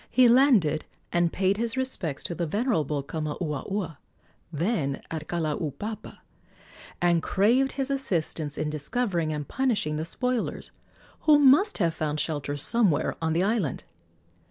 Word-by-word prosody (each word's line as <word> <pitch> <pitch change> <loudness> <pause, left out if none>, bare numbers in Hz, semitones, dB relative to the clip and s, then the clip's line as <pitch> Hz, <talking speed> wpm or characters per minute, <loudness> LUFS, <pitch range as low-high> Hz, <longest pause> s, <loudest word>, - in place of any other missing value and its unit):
He 255 0 +5
landed 230 - +4 0.3
and 175 -1 +2
paid 195 +1 +1
his 230 +2 -1
respects 205 - -2
to - - -3
the 170 0 -2
venerable 155 - 0
Kamauaua, 155 +3 -4 0.5
then 155 - -1
at 155 -1 -5
Kalaupapa, 165 - -4 0.8
and 175 -1 +3
craved 240 +10 +2
his 270 0 -2
assistance 165 - -2
in 150 0 -2
discovering 170 - -1
and 150 -1 -4
punishing 220 -13 0
the 155 - -3
spoilers, 250 +7 -2 0.6
who 300 -1 +8
must 290 +9 +5
have 170 -5 +1
found 155 -1 -2
shelter 145 -2 -2
somewhere 170 -2 +3
on 160 -1 0
the 170 +3 +2
island. 200 - -1
170 Hz, 130 wpm, -26 LUFS, 155-235 Hz, 0.8 s, who